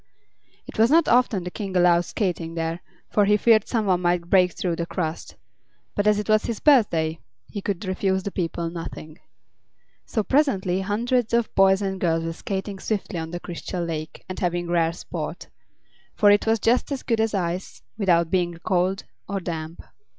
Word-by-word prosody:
It - - -9
was 225 +2 +5
not 325 +2 +4
often 240 -6 +3
the 180 - -5
King 195 -3 -3
allowed 175 -1 +4
skating 170 -5 -2
there, 165 +1 -2 0.3
for 205 - +3
he 210 +1 +4
feared 215 -1 +4
some 225 -3 0
one 180 -2 +2
might 175 -1 0
break 180 -3 +5
through 175 -3 -2
the 170 - -3
crust; 165 -3 -4 0.6
but 205 0 0
as 210 -1 +4
it 210 - -3
was 215 0 +3
his 230 -3 -3
birthday 165 - +3 0.3
he 205 - -6
could 195 0 -3
refuse 190 0 0
the 200 - -4
people 170 -2 -3
nothing. 165 -1 -8 0.9
So 220 - -1
presently 195 -10 +1
hundreds 235 +4 0
of 235 -1 +3
the - - -31
boys 195 +1 +4
and 190 -1 -3
girls 165 -2 +1
were 165 - -3
skating 195 +2 -4
swiftly 200 -4 -3
on 160 0 -5
the 175 +1 -5
Crystal 175 +1 -5
Lake 155 -1 -6
and 185 - -6
having 175 -1 -1
rare 165 -1 +2
sport; - - -6 0.7
for 205 -1 +5
it 205 +2 +3
was 225 0 +4
just 240 +7 +1
as 275 - -3
good 230 -2 0
as 220 -1 0
ice, 180 0 -3
without 170 -6 +2
being 175 -2 0
cold 185 +1 +1 0.3
or 200 0 -1
damp. 165 -2 -6
190 Hz, 185 wpm, -24 LUFS, 170-210 Hz, 0.9 s, was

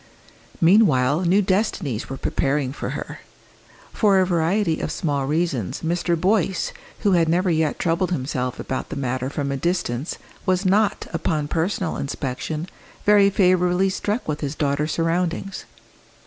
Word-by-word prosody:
Meanwhile 165 - +4
new 195 +4 +4
destinies 185 - -1
were 135 - -5
preparing 135 -1 -1
for - - -5
her. - - -7 0.7
For 205 -3 +3
a 185 - +4
variety 170 0 +1
of - - -3
small 145 -4 -1
reasons 150 - -1
Mr. 170 0 0
Boyce, 190 -1 +1 0.3
who 205 - +3
had 170 -3 +3
never 180 +2 +2
yet 160 -2 +1
troubled 170 +2 0
himself 130 -5 -2
about 130 - -4
the - - -5
matter 130 -1 -2
from 140 -1 -3
a 140 - -1
distance, 145 -3 -2 0.3
was 185 +1 +1
not, 205 +3 +2
upon 155 -2 -1
personal 170 +2 -1
inspection, 140 +4 -4 0.4
very 205 -1 +6
favourably 185 -1 +3
struck 210 +4 -2
with 150 -1 -2
his 145 0 -3
daughter's 145 +1 0
surroundings. 170 +3 -1
165 Hz, 145 wpm, -22 LUFS, 140-185 Hz, 0.7 s, very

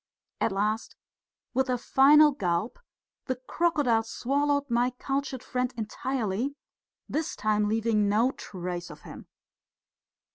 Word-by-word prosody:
At - - +1
last, 210 +3 -1 0.6
with 265 +1 +1
a 250 - +1
final 295 +5 +6
gulp, 195 - -2 0.5
the 260 - -1
crocodile 260 -2 +1
swallowed 285 +5 0
my 240 0 +2
cultured 270 -1 -3
friend 250 0 -1
entirely, 235 +2 -2 0.5
this 310 +1 -2
time 210 -1 +1
leaving 220 -2 +1
no 225 +5 +3
trace 180 -6 -6
of - - -11
him. - - -11
245 Hz, 115 wpm, -28 LUFS, 215-275 Hz, 0.6 s, final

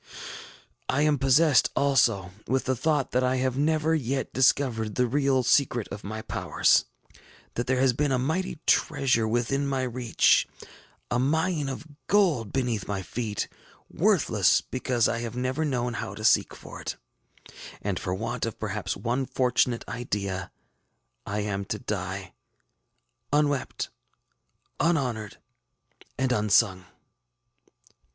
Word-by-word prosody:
ŌĆ£I 145 +3 +2
am 150 -2 +2
possessed, 135 +1 +4
also, 110 -10 +2 0.2
with 130 +2 0
the 130 - +1
thought 150 +1 0
that 125 +1 +2
I 130 0 +2
have 130 -1 0
never 155 +2 +1
yet 135 -3 -1
discovered 120 -5 +2
the 125 - +2
real 135 +1 +2
secret 120 -3 +2
of 100 - -7
my 110 +2 -5
powers; - - +2 0.7
that 120 - -3
there 130 0 +1
has 130 -1 +4
been 145 +3 0
a 130 - +2
mighty 160 +8 -1
treasure 135 -7 +2
within 120 +5 0
my 135 -1 -1
reach, 125 -2 +2 0.6
a 120 - +2
mine 160 +2 +1
of 135 +3 -6 0.2
gold 170 - +2
beneath 120 -6 -1
my 100 -2 -3
feet, 110 0 -3 0.4
worthless - - +3
because 125 -2 0
I 115 - -1
have 120 0 -5
never 130 +5 -1
known 125 -5 -1
how 100 -4 -5
to 110 - -5
seek - - +3
for - - -10
it; - - -4 0.9
and 100 -3 -1
for 90 - -2
want - - -3
of - - -6
perhaps - - -3
one 125 +3 -1
fortunate 125 -2 +1
idea, 100 -6 -3 0.8
I 105 +1 -1
am 100 -1 -2
to 105 - -3
die 95 -2 -4 1.0
ŌĆśUnwept, 145 -2 0 0.9
unhonored, 125 -11 0 0.8
and 130 0 0
unsung. 105 -4 +2
125 Hz, 135 wpm, -27 LUFS, 110-140 Hz, 1.0 s, possessed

